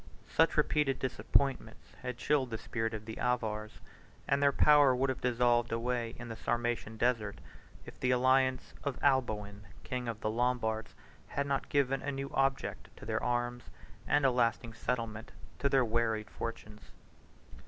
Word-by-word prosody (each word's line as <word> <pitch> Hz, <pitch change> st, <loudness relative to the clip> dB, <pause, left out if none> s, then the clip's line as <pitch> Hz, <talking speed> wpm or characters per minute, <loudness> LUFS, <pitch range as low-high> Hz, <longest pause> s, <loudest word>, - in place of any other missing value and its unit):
7 -, -, -19 dB
Such -, -, +4 dB
repeated 140 Hz, -3 st, +2 dB
disappointments 135 Hz, +1 st, -1 dB
had 125 Hz, -1 st, -4 dB
chilled 135 Hz, -3 st, +1 dB
the 115 Hz, -, -3 dB
spirit 115 Hz, 0 st, -3 dB
of 110 Hz, 0 st, -7 dB
the 110 Hz, 0 st, -7 dB
Avars, 110 Hz, -3 st, -2 dB, 0.5 s
and 140 Hz, +1 st, +2 dB
their 140 Hz, 0 st, +5 dB
power 145 Hz, -2 st, +6 dB
would 130 Hz, +1 st, +1 dB
have 130 Hz, -, -6 dB
dissolved 120 Hz, -1 st, +2 dB
away 115 Hz, 0 st, -1 dB
in 120 Hz, -, -8 dB
the 115 Hz, -, -6 dB
Sarmatian 120 Hz, -1 st, -2 dB
desert, 115 Hz, -4 st, 0 dB, 0.5 s
if -, -, -12 dB
the 125 Hz, -, 0 dB
alliance 130 Hz, +1 st, +2 dB
of 140 Hz, -3 st, -3 dB
Alboin, 110 Hz, -7 st, +1 dB, 0.2 s
king 125 Hz, -2 st, -4 dB
of 115 Hz, -2 st, -4 dB
the 110 Hz, -, 0 dB
Lombards, 115 Hz, -2 st, -1 dB, 0.3 s
had 140 Hz, -, -2 dB
not 140 Hz, -1 st, -1 dB
given 135 Hz, -1 st, +1 dB
a 145 Hz, -, -2 dB
new 135 Hz, 0 st, -4 dB
object 135 Hz, 0 st, 0 dB
to -, -, -11 dB
their -, -, -1 dB
arms, 120 Hz, 0 st, -1 dB, 0.4 s
and 145 Hz, -1 st, +3 dB
a 135 Hz, -, +5 dB
lasting 115 Hz, -1 st, 0 dB
settlement 115 Hz, -1 st, -3 dB, 0.3 s
to 140 Hz, -, +2 dB
their 135 Hz, -2 st, +4 dB
wearied 110 Hz, -2 st, 0 dB
fortunes. 110 Hz, -2 st, -7 dB
120 Hz, 165 wpm, -32 LUFS, 115-135 Hz, 0.5 s, power